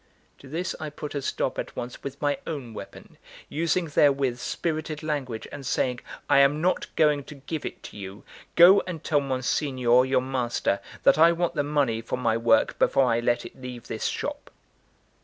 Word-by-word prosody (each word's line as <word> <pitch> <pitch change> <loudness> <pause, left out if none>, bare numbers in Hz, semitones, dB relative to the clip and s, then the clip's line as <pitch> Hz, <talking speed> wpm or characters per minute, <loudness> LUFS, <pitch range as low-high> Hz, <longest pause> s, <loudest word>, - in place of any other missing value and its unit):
To 140 - -14
this 170 +4 -2
I 155 - -4
put 150 0 -7
a 140 - -2
stop - - -2
at - - -5
once 120 0 -6
with 140 0 -7
my 145 -1 0
own 135 -8 -5
weapon, - - -11 0.3
using 170 +3 0
therewith 140 -4 +2
spirited 155 +3 -3
language, 135 -7 -3
and 140 - -8
saying: 125 -1 0 0.3
"I - - +5
am 140 +2 +4
not 180 +3 0
going 150 -2 +3
to 150 - -10
give 145 +3 -5
it - - -9
to - - -10
you! 100 0 -8 0.3
Go 185 +4 +8
and 165 -4 -6
tell 145 -2 +2
Monsignor, 130 -2 +2
your 130 -1 +2
master, 125 -6 -1 0.2
that - - +5
I 165 +1 +7
want 170 0 -1
the 150 - 0
money 140 -6 0
for 115 - -3
my 115 -3 +1
work 115 -1 +2
before 135 - +4
I 115 - +2
let 120 0 0
it - - -12
leave 125 -2 -8
this - - -4
shop." - - -3
140 Hz, 190 wpm, -26 LUFS, 125-155 Hz, 0.3 s, Go